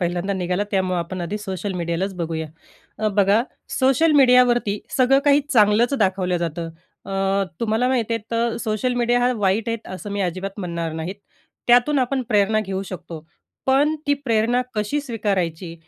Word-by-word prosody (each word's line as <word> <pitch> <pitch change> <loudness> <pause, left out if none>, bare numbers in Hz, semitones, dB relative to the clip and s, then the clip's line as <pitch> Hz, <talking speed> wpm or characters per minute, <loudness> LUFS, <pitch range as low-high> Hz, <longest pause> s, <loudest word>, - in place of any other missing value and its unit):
पहिल्यांदा 175 +2 -1
निघाला 185 +1 -1
त्यामुळं 185 -2 0
आपण 175 +2 -4
आधी 175 +5 -3
सोशल 195 -1 -4
मीडियालाच 170 +3 -2
बघूया. 165 -2 -3 0.5
अ, 215 - +1
बघा, 205 +3 +4 0.4
सोशल 270 +5 +3
मीडियावरती 250 -6 +4 0.2
सगळं 265 +1 +4
काही 285 0 +5
चांगलंच 220 +3 +4
दाखवलं 185 -3 +1
जातं, 170 -1 -3 0.4
अ, 195 0 +1 0.2
तुम्हाला 230 +2 +1
माहिती 235 -3 0
आहे 230 - -3
तर 230 0 0
सोशल 225 +3 -1
मीडिया 245 0 +2
हा 250 +1 +2
वाईट 210 +2 +1
आहेत 230 -1 -4
असं 205 +2 -7
मी 200 0 -2
अजिबात 190 +2 -3
म्हणणार 170 -3 -3
नाहीत. 160 +4 -4 0.5
त्यातून 245 +4 +4
आपण 260 +1 0
प्रेरणा 215 +1 +3
घेऊ 195 -2 -3
शकतो, 165 -3 -8 0.4
पण 280 +4 +3
ती 285 - +3
प्रेरणा 240 -3 +1
कशी 215 +8 -1
स्वीकारायची, 190 - -2
210 Hz, 160 wpm, -22 LUFS, 185-245 Hz, 0.5 s, काही